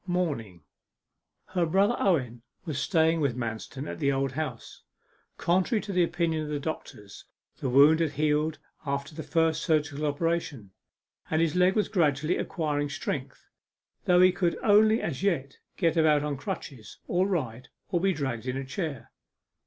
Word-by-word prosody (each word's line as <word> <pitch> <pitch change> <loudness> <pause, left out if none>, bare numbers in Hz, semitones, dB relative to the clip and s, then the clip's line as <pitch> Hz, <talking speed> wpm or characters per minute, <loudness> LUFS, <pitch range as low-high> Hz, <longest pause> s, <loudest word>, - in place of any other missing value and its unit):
MORNING 140 - -2 0.9
Her 180 -2 0
brother 200 +7 +3
Owen 125 - +1 0.2
was 150 -4 -3
staying 160 0 +2
with 130 -4 0
Manston 120 +4 -5
at - - -6
the 140 -3 +2
Old 135 0 0
House. 135 -4 -5 0.6
Contrary 190 +6 +1
to 200 - -5
the 180 - +3
opinion 170 -2 0
of 150 - -5
the 150 -1 -2
doctors, 105 -9 -7 0.3
the 135 - -2
wound 145 +5 +6
had 160 -3 0
healed 150 +1 +1 0.3
after 140 +1 -3
the 160 - -6
first 160 -1 +1
surgical 150 -2 0
operation, 145 - -2 0.6
and 155 - +1
his 165 -1 +1
leg 180 +1 +4
was 215 - +2
gradually 155 -4 +1
acquiring 145 -4 -2
strength, 140 -3 -5 0.6
though 180 0 +5
he 185 0 +7
could 175 -1 0
only 215 +1 +5
as 160 -3 -3
yet 140 -9 -1 0.2
get 170 -3 +2
about 155 -3 +4
on 150 -1 -2
crutches, 135 - -7
or 180 +2 +1
ride, 130 - -3 0.2
or 175 - +1
be 195 +1 +3
dragged 130 -8 -3
in 125 +1 -2
a 135 - -4
chair. 140 - -5
155 Hz, 160 wpm, -28 LUFS, 140-175 Hz, 0.9 s, he